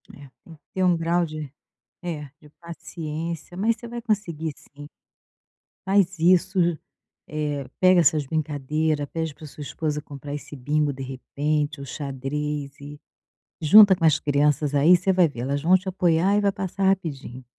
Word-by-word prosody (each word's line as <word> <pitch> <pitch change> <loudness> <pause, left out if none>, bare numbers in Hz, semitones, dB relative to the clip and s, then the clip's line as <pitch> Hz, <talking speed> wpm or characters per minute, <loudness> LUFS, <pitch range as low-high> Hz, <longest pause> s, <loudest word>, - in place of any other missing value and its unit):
É. 140 -1 -13 0.2
Tem 165 - -13
que 150 - -27
ter 190 - 0
um 180 -1 +4
grau 170 +1 +1
de 155 -3 -7 0.5
é, 160 -4 -4 0.2
de 150 - -17
paciência, 165 0 -6
mas 220 +5 +1
você 235 - -10
vai 235 0 -6
conseguir 170 -9 -2
sim. 145 +1 -14 1.0
Faz 190 -2 +2
isso, 185 +3 +3 0.7
eh, 150 -2 -3
pega 185 -1 +6
essas 155 -3 +2
brincadeira, 150 0 -1
pede 160 0 -4
para 155 - -12
sua 150 - -12
esposa 150 +1 -3
comprar 145 0 -9
esse 145 - -9
bingo, 145 +3 0
de 135 - -9
repente, 145 +3 -2
o 140 - -7
xadrez 140 +1 -4
e 145 +1 -10 0.6
junta 200 +5 +8
com 170 - -7
as 160 -2 +4
crianças 145 0 +1
aí, 155 +6 +6
você 190 +2 +1
vai 180 -2 +4
ver, 130 -6 -7
elas 140 +3 -2
vão 180 +5 +5
te 185 +1 -12
apoiar 180 +1 +2
e - - +2
vai 200 -1 +2
passar 195 0 -3
rapidinho. 140 -9 -2
155 Hz, 165 wpm, -24 LUFS, 145-180 Hz, 1.0 s, junta